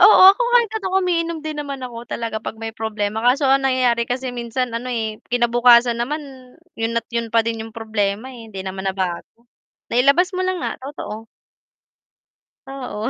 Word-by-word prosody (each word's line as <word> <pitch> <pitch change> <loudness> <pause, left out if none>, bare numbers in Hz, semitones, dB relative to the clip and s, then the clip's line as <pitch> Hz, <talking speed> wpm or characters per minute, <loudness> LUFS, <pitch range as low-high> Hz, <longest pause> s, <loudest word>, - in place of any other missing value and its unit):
Oo, 410 -1 +8
kahit 485 -2 +3
ako 380 -2 0
umiinom 335 -3 -1
din 310 -1 -5
naman 280 -2 -5
ako 240 -2 -7
talaga 230 -2 -4
pag 220 0 -6
may 225 - -3
problema, 220 0 -2
kaso 265 +3 +3
ang 270 0 +3
nangyayari 250 -3 +2
kasi 255 +2 -3
minsan 245 +1 -2
ano, 250 +1 -4
eh, 220 -2 -2 0.2
kinabukasan 240 0 +5
naman 280 +7 -2 0.6
yun 225 0 -1
at 225 - -35
'yun 230 -1 -3
pa 230 - +5
din 225 0 -3
'yung 225 - -11
problema, 220 +1 -2
eh, 245 -3 -10
hindi 195 -3 -7
naman 190 0 -5
nabago, 190 +5 -4 0.4
nailabas 280 +10 +3
mo 370 - 0
lang 370 -1 -1
nga - - -3
totoo. 225 -6 -7 1.4
Oo. 250 -6 -4
240 Hz, 170 wpm, -21 LUFS, 225-275 Hz, 1.4 s, Oo